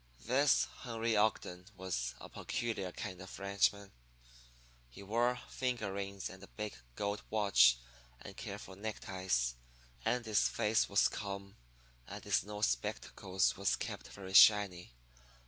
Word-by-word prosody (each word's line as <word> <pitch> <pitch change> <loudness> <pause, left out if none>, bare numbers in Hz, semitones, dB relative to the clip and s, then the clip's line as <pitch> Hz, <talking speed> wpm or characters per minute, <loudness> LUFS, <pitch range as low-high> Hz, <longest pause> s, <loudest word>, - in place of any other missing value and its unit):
"This 135 +3 +4
Henry 115 -2 -1
Ogden 105 -4 0
was 60 -10 -3
a - - -9
peculiar 110 -6 -3
kind 90 -1 -6
of 95 - -9
ranchman. 100 0 +1 1.0
He 80 +11 -12
wore 120 +4 +1
finger 120 -6 -2
rings 100 -1 -4
and 95 0 -11
a 100 - -11
big 105 -1 -5 0.2
gold 100 0 -2
watch 95 - +5 0.4
and - - -10
careful 95 - -7
neckties. 95 - -1 0.5
And 125 -1 0
his 110 -2 +3
face 110 +1 +1
was 100 - +4
calm, 100 -1 -6 0.5
and - - -8
his - - +2
nose 105 +1 -1
spectacles 90 +9 -1
was - - +1
kept - - -6
very 95 -1 -9
shiny. 95 - +6
100 Hz, 130 wpm, -34 LUFS, 95-110 Hz, 1.0 s, shiny